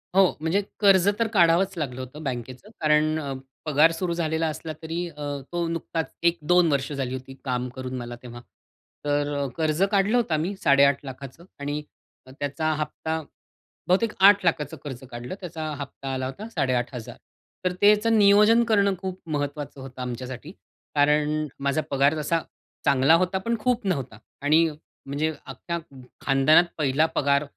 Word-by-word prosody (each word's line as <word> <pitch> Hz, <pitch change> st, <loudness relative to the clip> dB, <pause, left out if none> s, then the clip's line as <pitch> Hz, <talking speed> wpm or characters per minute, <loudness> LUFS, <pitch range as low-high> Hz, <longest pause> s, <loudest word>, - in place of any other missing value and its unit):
हो, 195 Hz, -, +7 dB, 0.2 s
म्हणजे 165 Hz, +6 st, +1 dB, 0.2 s
कर्ज 195 Hz, -2 st, +5 dB
तर 230 Hz, -, +2 dB
काढावंच 180 Hz, +1 st, +4 dB
लागलं 130 Hz, -5 st, -3 dB
होतं 130 Hz, +5 st, -9 dB
बँकेचं. 130 Hz, -, -5 dB
कारण 155 Hz, 0 st, +3 dB
अ, 140 Hz, -3 st, -4 dB, 0.3 s
पगार 155 Hz, +2 st, +5 dB
सुरू 170 Hz, +1 st, -2 dB
झालेला 160 Hz, -1 st, 0 dB
असला 155 Hz, +1 st, -5 dB
तरी 165 Hz, +2 st, -3 dB
अ, 150 Hz, -2 st, -12 dB, 0.3 s
तो 175 Hz, -1 st, -1 dB
नुकताच 165 Hz, -1 st, -3 dB, 0.2 s
1-2 170 Hz, 0 st, +2 dB
वर्ष 140 Hz, +1 st, 0 dB
झाली 135 Hz, -2 st, -3 dB
होती 130 Hz, +1 st, -7 dB
काम 125 Hz, -1 st, -1 dB
करून 130 Hz, -1 st, -5 dB
मला 120 Hz, -1 st, -6 dB
तेव्हा. 120 Hz, -1 st, -9 dB, 0.6 s
तर 145 Hz, 0 st, 0 dB
अ, 140 Hz, -, -1 dB
कर्ज 155 Hz, +1 st, 0 dB
काढलं 205 Hz, +4 st, +3 dB
होतं 225 Hz, -9 st, 0 dB
आम्ही 165 Hz, +6 st, -1 dB
8.50लाखाचं 140 Hz, +1 st, +1 dB
आणि 145 Hz, +1 st, -3 dB, 0.4 s
अ, 130 Hz, -, -14 dB
त्याचा 145 Hz, +3 st, -1 dB
हप्ता 160 Hz, +1 st, -3 dB, 0.7 s
बहुतेक 200 Hz, +5 st, +2 dB
8लाखाचं 180 Hz, -7 st, +4 dB
कर्ज 130 Hz, -3 st, -7 dB
काढलं. 120 Hz, +7 st, -6 dB
त्याचा 160 Hz, -4 st, -5 dB
हप्ता 135 Hz, -1 st, -6 dB
आला 130 Hz, 0 st, -2 dB
होता 195 Hz, +12 st, -6 dB
8,500 125 Hz, -, -2 dB, 0.5 s
तर 180 Hz, -, +1 dB
त्याचं 210 Hz, +2 st, +5 dB
नियोजन 210 Hz, +3 st, +6 dB
करणं 200 Hz, -3 st, +3 dB
खूप 190 Hz, 0 st, -5 dB
महत्वाचं 145 Hz, -1 st, -3 dB
होतं 130 Hz, -1 st, -9 dB
आमच्यासाठी. 125 Hz, +4 st, -6 dB, 0.4 s
कारण 150 Hz, +1 st, +2 dB, 0.2 s
माझा 140 Hz, +2 st, +1 dB
पगार 140 Hz, +3 st, +3 dB
तसा 165 Hz, +2 st, 0 dB, 0.4 s
चांगला 140 Hz, +3 st, +5 dB
होता 185 Hz, +2 st, +1 dB
पण 230 Hz, +4 st, -1 dB
खूप 245 Hz, 0 st, 0 dB
नव्हता 135 Hz, -, -2 dB, 0.2 s
आणि 155 Hz, +3 st, +4 dB, 0.4 s
म्हणजे 145 Hz, +3 st, -1 dB
अख्ख्या 170 Hz, -1 st, -5 dB
ख 155 Hz, -, -19 dB, 0.3 s
खानदानात 135 Hz, +5 st, +5 dB
पहिला 150 Hz, +1 st, +2 dB
पगार, 140 Hz, 0 st, +2 dB
155 Hz, 150 wpm, -25 LUFS, 135-175 Hz, 0.7 s, हो